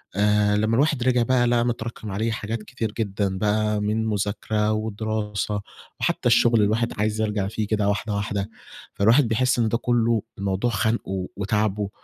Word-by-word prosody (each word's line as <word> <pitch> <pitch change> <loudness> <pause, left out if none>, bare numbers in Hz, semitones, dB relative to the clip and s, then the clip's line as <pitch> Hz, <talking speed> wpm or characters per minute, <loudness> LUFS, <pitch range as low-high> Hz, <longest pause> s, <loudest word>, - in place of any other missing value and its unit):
آآ، 105 0 +3
لما 110 +2 +1
الواحد 140 -1 +2
رجع 125 -2 +3
بقى 120 0 +2
لقى 120 0 +2
متراكم 115 -2 -4
عليه 110 +4 -1
حاجات 110 0 -4
كتير 110 -1 -4
جدًا 100 -3 -2
بقى 105 +1 +1
من 110 +2 0
مذاكرة 105 +1 -1
ودراسة 110 -1 -2 0.4
وحتى - - 0
الشغل، 115 -1 +4
الواحد 110 +3 +1
عايز 110 +1 0
يرجع 105 -2 -1
فيه 110 0 -3
كده 105 -2 0
واحدة 105 +1 -1
واحدة، 100 0 -2 0.4
فالواحد 115 +6 +4
بيحس 125 +2 +1
إن 115 - +3
ده 115 - +1
كله 115 -2 +1 0.2
الموضوع 100 +4 0
خانقه 100 -4 -1
وتاعبه 105 0 0
110 Hz, 160 wpm, -24 LUFS, 105-115 Hz, 0.4 s, الشغل